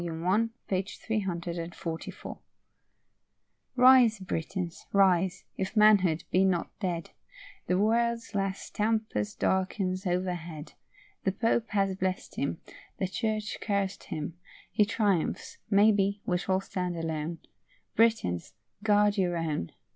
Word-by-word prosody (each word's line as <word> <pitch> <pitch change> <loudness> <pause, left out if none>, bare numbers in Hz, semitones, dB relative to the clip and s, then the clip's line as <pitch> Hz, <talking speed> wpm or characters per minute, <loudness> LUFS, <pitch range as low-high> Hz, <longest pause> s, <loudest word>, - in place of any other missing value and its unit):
I, 180 +7 +1 0.2
p. 185 -1 +1
344.] 170 -5 -4 1.4
Rise, 250 -3 +7
Britons, 180 -1 -4
rise, 190 -2 +3
if 190 +3 -3
manhood 195 -6 +5
be 185 - +4
not 185 -3 +1
dead; 175 -4 -3 0.6
The 180 - +2
world's 230 +3 +1
last 195 -1 -2
tempest 215 -1 -1
darkens 190 0 0
overhead; 175 -3 -3 0.5
The 190 - +2
Pope 230 +2 +1
has 195 -2 +1
bless'd 185 0 -2
him; 140 +4 -2 0.4
The 190 - 0
Church 215 +2 -2
caress'd 200 -2 -1
him; 160 +2 -5 0.3
He 210 - +4
triumphs; 205 -5 0
maybe, 200 -1 +4
we 180 -1 +1
shall 190 +1 0
stand 180 -2 -3
alone: 160 0 -3 0.6
Britons, 220 - +2 0.3
guard 205 -1 +3
your 175 -2 +1
own. 155 - -2
190 Hz, 110 wpm, -29 LUFS, 175-210 Hz, 1.4 s, Rise